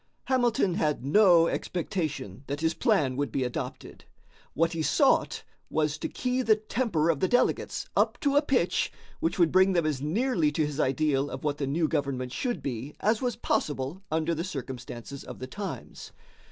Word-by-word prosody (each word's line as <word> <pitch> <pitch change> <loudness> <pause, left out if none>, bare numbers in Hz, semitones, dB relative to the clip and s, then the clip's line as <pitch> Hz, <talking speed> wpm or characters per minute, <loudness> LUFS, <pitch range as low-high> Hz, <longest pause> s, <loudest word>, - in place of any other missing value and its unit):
Hamilton 240 -7 +2
had 150 -5 0
no 175 +1 +6
expectation 155 - -3
that 145 +2 -3
his 160 0 +2
plan 135 -5 +2
would 145 -4 -1
be 135 - 0
adopted. 125 -1 -6 0.5
What 165 +1 +2
he 165 - -2
sought - - +2 0.3
was 150 -1 0
to - - -3
key 250 0 -1
the 225 -3 +4
temper 210 -7 0
of 150 - -3
the 185 - +2
delegates 245 +4 +1
up - - +2
to 285 -1 +1
a 290 - +6
pitch 255 - +1 0.3
which 165 - -1
would 170 -3 +4
bring 190 +1 +5
them 170 -3 +2
as 150 -4 -1
nearly 170 - +1
to 155 0 +1
his 145 0 -5
ideal 140 0 +1
of 130 - -7
what 150 -1 -1
the 140 - -1
new 155 +4 +1
government 135 -5 -2
should 245 - -2
be 130 +2 -4
as 215 +1 +1
was 245 -2 -1
possible 145 +5 -2
under 160 +1 +1
the 165 +1 -2
circumstances 130 -5 -7
of - - -9
the 130 - -6
times. 200 +9 -7
160 Hz, 180 wpm, -28 LUFS, 140-195 Hz, 0.5 s, no